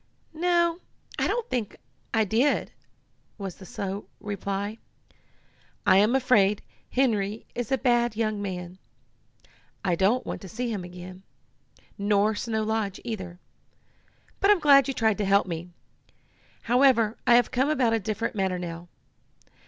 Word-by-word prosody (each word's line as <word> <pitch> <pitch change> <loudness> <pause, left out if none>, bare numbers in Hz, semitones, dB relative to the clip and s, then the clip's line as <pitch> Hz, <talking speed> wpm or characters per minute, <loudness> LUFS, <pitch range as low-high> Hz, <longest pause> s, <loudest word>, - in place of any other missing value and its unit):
"No, 340 +1 +1 0.4
I - - +2
don't 480 -1 -1
think 235 -5 -3 0.3
I 220 -1 +3
did," 235 +8 +1 0.7
was 195 -4 -6
the 190 - -12
slow 195 +1 -5
reply. 200 +1 -4 1.1
"I 185 - +6
am 210 +6 +4
afraid 210 -6 +3 0.3
Henry 215 -5 0
is 245 -1 -4
a 265 - +3
bad 240 -3 +2
young 215 -2 -1
man. 180 -2 -6 1.1
I 180 - +2
don't 195 +8 +2
want - - -5
to 190 - -9
see 240 +4 -3
him 195 -4 -4
again, 180 +1 -10 0.8
nor 205 +1 +2
Snow 220 0 -2
Lodge 215 -3 -2
either. 190 -7 -5 1.0
But 395 - +3
I'm 415 -3 +6
glad 280 -4 +6
you 270 - -2
tried 220 -3 +1
to 205 - +1
help 200 +1 +4
me. 170 -1 -5 0.9
However, 240 -3 +4
I 240 - +7
have 245 - +3
come 265 +3 +1
about 250 -7 +2
a 225 - +2
different 215 +3 -3
matter 190 -3 -1
now. 170 -1 -6
215 Hz, 145 wpm, -26 LUFS, 195-245 Hz, 1.1 s, I